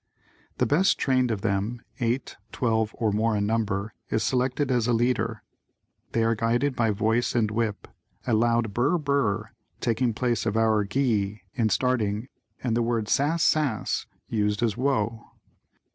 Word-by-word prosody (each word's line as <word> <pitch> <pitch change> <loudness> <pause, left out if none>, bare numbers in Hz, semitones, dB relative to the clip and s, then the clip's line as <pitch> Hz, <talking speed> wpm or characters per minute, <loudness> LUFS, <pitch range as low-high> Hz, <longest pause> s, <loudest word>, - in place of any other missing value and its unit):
The - - +2
best 185 +7 +3
trained 130 -2 +2
of 110 -4 -2
the 110 - 0
team 105 +5 -2 0.2
(eight, 120 +2 -1 0.2
twelve 110 -4 +1
or 110 -3 +1
more 110 +1 +1
in 100 - 0
number) 105 -1 -1 0.2
is 110 - 0
selected 130 +2 0
as 120 -2 +1
a 120 - +2
leader. 115 -1 0 0.7
They 115 - +2
are 115 0 +3
guided 120 +5 0
by 115 -1 +2
voice 110 +4 +1
and 110 -3 +2
whip, 110 -2 -2 0.4
a 120 - 0
loud 115 -1 +2
"Brr 135 - +2
Brr" 125 -9 0 0.3
taking 120 +1 +1
the 115 - 0
place 120 -1 0
of 110 +1 0
our 110 -2 +3
"Gee" 105 -5 0
in 115 -3 +1
starting 115 0 0 0.3
and 120 -3 0
the 120 - +2
word 115 -2 -1
"Sass 155 +4 +2
Sass" 145 -9 +1 0.2
used 105 0 0
as 110 -4 +1
"Whoa." 115 -4 0
115 Hz, 165 wpm, -26 LUFS, 110-125 Hz, 0.7 s, best